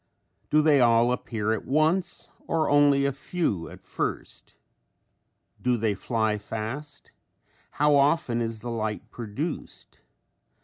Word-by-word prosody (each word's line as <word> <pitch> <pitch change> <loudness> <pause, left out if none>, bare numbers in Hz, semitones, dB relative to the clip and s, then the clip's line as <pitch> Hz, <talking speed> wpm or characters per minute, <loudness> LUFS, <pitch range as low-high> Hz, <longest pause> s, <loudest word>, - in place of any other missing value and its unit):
Do 155 0 +4
they 150 -3 +5
all 120 0 +4
appear 110 -3 -1
at 110 - -3
once 160 +6 0 0.2
or 160 -2 +1
only 145 -1 +4
a 140 - +2
few 135 - -2
at - - -13
first? - - -5 1.1
Do 125 -1 +1
they 110 -2 0
fly 110 +1 -1
fast? 115 +8 -7 0.6
How 150 0 +2
often 140 -4 +2
is 115 -1 -4
the 120 +1 -5
light 110 -2 -4
produced? 120 +8 -6
125 Hz, 125 wpm, -26 LUFS, 110-150 Hz, 1.1 s, they